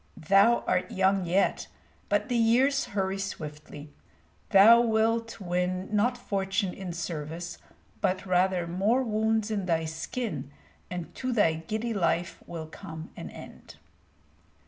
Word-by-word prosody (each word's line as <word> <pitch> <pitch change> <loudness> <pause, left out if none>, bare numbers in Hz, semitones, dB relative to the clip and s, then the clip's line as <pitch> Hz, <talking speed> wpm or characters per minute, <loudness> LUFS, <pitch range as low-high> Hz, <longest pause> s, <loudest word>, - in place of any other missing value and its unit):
"Thou 200 +8 +4
art 180 - 0
young 190 -1 +1
yet, 185 +4 +1 0.4
but - - +1
the 245 - -1
years 250 +5 +3
hurry 195 -1 -2
swiftly. 150 -5 -7 0.6
Thou 225 +5 +8
wilt 230 0 +1
win 185 +2 -2
not 245 +4 +2
fortune 195 -4 -1
in 190 -2 -6
service, 170 0 -5 0.4
but 185 +1 0
rather 185 -1 +2
more 200 +9 +1
wounds 220 -1 0
in 200 -3 -2
thy 165 -2 +1
skin, 160 - -4 0.4
and 180 -2 -6
to 255 -1 -3
thy 205 -9 +3
giddy 215 +9 -3
life 170 -3 0
will 165 -2 -6
come 160 0 -9
an - - -7
end." - - -12
190 Hz, 130 wpm, -28 LUFS, 170-220 Hz, 0.6 s, Thou